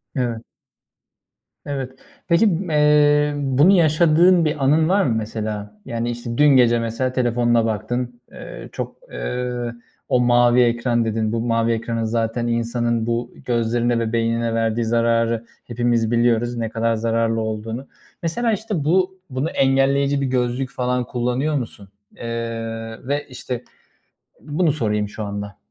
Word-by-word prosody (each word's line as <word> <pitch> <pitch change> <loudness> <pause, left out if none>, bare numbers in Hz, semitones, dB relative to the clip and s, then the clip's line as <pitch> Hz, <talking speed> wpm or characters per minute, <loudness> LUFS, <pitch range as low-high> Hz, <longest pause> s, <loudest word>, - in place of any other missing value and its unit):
Evet. 120 -3 -1 1.2
Evet. 135 -2 -4 0.4
Peki, 170 +5 +4
ımm, 180 -2 0
eee, 150 -1 +4
bunu 140 +6 +4
yaşadığın 170 +1 +4
bir 150 -2 -1
anın 155 +4 +3
var 195 +1 +3
mı 115 -7 +1
mesela? 105 -1 -4
Yani, 115 0 -3
işte, 120 0 -5
dün 150 - +5
gece 125 -4 +5
mesela 115 +3 -2
telefonuna 120 -2 +2
baktın, 120 +3 -3
eee, - - -9
çok, - - -5 0.2
eee, 120 - -3 0.4
o 125 - +3
mavi 120 0 +4
ekran 120 0 +1
dedin. 110 -1 -1
Bu 115 0 -1
mavi 115 0 +1
ekranın 115 0 -2
zaten 115 +1 -1
insanın 120 0 0
bu 120 +1 -2
gözlerine 120 0 +1
ve 115 0 -2
beynine 115 0 0
verdiği 115 0 0
zararı 115 0 +1 0.2
hepimiz 120 -1 0
biliyoruz 120 0 +2
ne 115 -1 -2
kadar 115 0 0
zararlı 115 0 0
olduğunu. 110 +4 -4 0.4
Mesela, 225 +8 0
işte 210 -6 -2
bu, 185 +3 +1
bunu 130 +5 -2
engelleyici 140 +1 +2
bir - - 0
gözlük 125 0 -1
falan 125 -1 -1
kullanıyor 125 +5 -1
musun? 110 -7 -5 0.3
Eee, 115 - -7 0.8
ve, 145 +1 -1
işte, 125 -1 -5 0.8
bunu 155 +2 +1
sorayım 105 -7 -1
şu 110 - -6
anda. 100 -1 -6
120 Hz, 140 wpm, -21 LUFS, 115-140 Hz, 1.2 s, dün